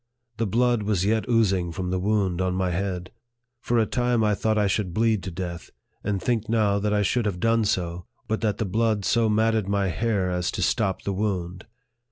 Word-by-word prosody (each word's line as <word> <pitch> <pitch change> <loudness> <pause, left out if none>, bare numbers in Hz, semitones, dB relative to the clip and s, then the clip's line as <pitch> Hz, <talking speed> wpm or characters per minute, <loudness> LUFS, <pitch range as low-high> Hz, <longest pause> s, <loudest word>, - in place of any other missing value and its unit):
The 115 -1 0
blood 120 +2 +2
was 100 -3 0
yet 110 +3 0
oozing 95 -7 +2
from 90 +1 -4
the 95 - 0
wound 95 -2 0
on 90 -1 0
my 95 -1 0
head. 90 0 -3 0.5
For 120 0 0
a 110 - +4
time 120 -1 +1
I 105 -1 +3
thought 110 +2 0
I 105 - +3
should 95 -2 -1
bleed 110 -2 +2
to 95 - -5
death; 85 -1 -6 0.3
and 100 -1 -1
think 115 0 -1
now 105 -3 +2
that 105 +1 -1
I 105 0 +2
should 115 +3 +1
have 90 -3 -2
done 115 0 +2
so, 85 -3 -2 0.2
but 110 - -1
that 105 -3 0
the 110 - -1
blood 110 0 0
so 115 +1 +2
matted 110 -1 +2
my 100 -1 +1
hair 100 -1 0
as 90 0 -1
to - - -1
stop 95 -1 0
the 100 - -2
wound. 95 -2 -3
105 Hz, 215 wpm, -25 LUFS, 95-110 Hz, 0.5 s, a